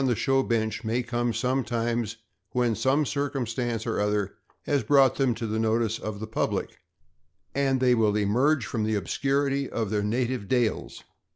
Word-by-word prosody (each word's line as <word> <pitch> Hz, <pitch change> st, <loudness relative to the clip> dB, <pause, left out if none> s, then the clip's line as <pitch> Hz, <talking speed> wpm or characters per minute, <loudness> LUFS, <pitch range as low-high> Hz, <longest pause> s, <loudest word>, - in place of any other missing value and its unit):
the 120 Hz, -, +2 dB
show 135 Hz, +4 st, +2 dB
bench 110 Hz, -3 st, -1 dB
may 115 Hz, +3 st, 0 dB
come 120 Hz, 0 st, -1 dB
sometime 120 Hz, -2 st, 0 dB, 0.5 s
when 120 Hz, -2 st, +2 dB
some 130 Hz, +7 st, +2 dB
circum 140 Hz, -1 st, -2 dB
stance 115 Hz, -1 st, -2 dB
or 115 Hz, -, -1 dB
other 105 Hz, -1 st, 0 dB, 0.3 s
has 145 Hz, -2 st, +1 dB
brought 135 Hz, +3 st, +4 dB
them 130 Hz, -4 st, +2 dB
to 115 Hz, -, -4 dB
the 110 Hz, 0 st, -1 dB
notice 115 Hz, 0 st, +1 dB
of 105 Hz, -1 st, -5 dB
the 110 Hz, -, -4 dB
public, 110 Hz, -, -2 dB, 0.7 s
and 135 Hz, -1 st, +1 dB
they 125 Hz, -1 st, +4 dB
will 110 Hz, -3 st, +2 dB
emerge 120 Hz, +6 st, +2 dB
from 110 Hz, +1 st, -2 dB
the 110 Hz, 0 st, 0 dB
obscurity 140 Hz, +5 st, 0 dB
of 110 Hz, -3 st, -2 dB
their 105 Hz, -1 st, +1 dB
native 120 Hz, +1 st, -1 dB
dales. 120 Hz, -1 st, -1 dB
120 Hz, 170 wpm, -26 LUFS, 110-130 Hz, 0.7 s, brought